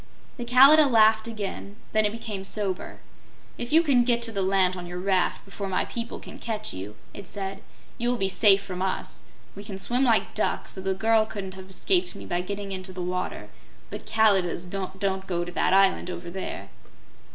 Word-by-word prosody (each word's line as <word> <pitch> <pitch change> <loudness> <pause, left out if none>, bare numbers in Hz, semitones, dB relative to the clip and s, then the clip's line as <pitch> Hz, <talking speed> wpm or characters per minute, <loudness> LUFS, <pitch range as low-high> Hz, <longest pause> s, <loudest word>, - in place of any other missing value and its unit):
The 240 - -5
Kalidah 275 +5 +7
laughed 220 -1 +4
again; 205 -2 -5 0.2
then 215 -1 +3
it - - -3
became 215 -3 -6
sober. 195 -1 -3 0.6
"If 240 - -4
you 325 +2 +5
get 245 -5 +3
to 230 - 0
the 200 -3 -2
land 190 -1 +3
on 180 -1 -7
your 175 0 -6
raft 185 -1 0
before 195 0 -6
my 185 - 0
people 235 -1 -5
can - - -11
catch 215 -2 -4
you," 95 +3 -7 0.2
it 200 -3 -9
said, 195 0 -5 0.4
"you 240 0 +1
will 245 - +1
be 195 - +1
safe 195 0 +5
from 185 -2 -6
us. 190 0 -3 0.3
We 200 - -9
can 200 -2 -7
swim 245 +7 0
like 230 -4 +2
ducks, 215 - -1
so 190 - -7
the 190 0 -1
girl 220 +2 +3
couldn't 195 -3 -6
have 190 0 -11
escaped 180 -1 0
me - - -9
by 175 0 -1
getting 200 +2 -5
into 185 0 -5
the 185 - -9
water; 180 +1 -4 0.4
but - - -7
Kalidahs 195 -6 +2
don't 190 +1 -3
go 175 -1 -1
to 175 - -7
that - - +1
island 190 -1 +4
over 175 -1 -6
there." 190 +1 -6
195 Hz, 195 wpm, -26 LUFS, 185-220 Hz, 0.6 s, Kalidah